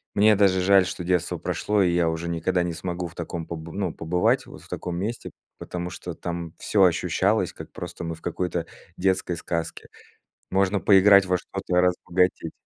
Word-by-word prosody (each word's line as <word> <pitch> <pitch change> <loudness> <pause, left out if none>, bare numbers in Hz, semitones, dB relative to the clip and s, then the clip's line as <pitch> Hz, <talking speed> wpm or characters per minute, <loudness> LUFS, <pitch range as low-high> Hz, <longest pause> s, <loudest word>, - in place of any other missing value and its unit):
мне 105 +1 +5
даже 95 -2 +3
жаль, 95 0 +5
что 90 - -5
детство 90 0 0
прошло, 90 +5 0
и 90 -2 +2
я 85 -1 +2
уже 80 +1 -3
никогда 85 +2 0
не 85 -1 -2
смогу 85 +2 -4
в 85 - -15
таком 85 -1 -5
поб 80 0 -7
ну, 95 -4 -2
побывать 90 +2 +1
вот - - -12
в - - -16
таком 90 -1 -4
месте, 110 +6 -4 0.3
потому 90 0 -5
что 90 -2 -7
там 85 -2 -5
всё 100 -2 +2
ощущалось, 90 -3 +2
как - - -10
просто 85 0 -7
мы 85 0 -4
в 80 - -18
какой-то 90 -2 -2 0.3
детской 90 -2 0
сказке. 85 -1 -4 0.7
Можно 95 +1 +2
поиграть 100 -1 +6
во 90 - +2
что-то 90 0 -4
и - - +6
разбогатеть. 90 -2 +1
90 Hz, 185 wpm, -25 LUFS, 85-95 Hz, 0.7 s, поиграть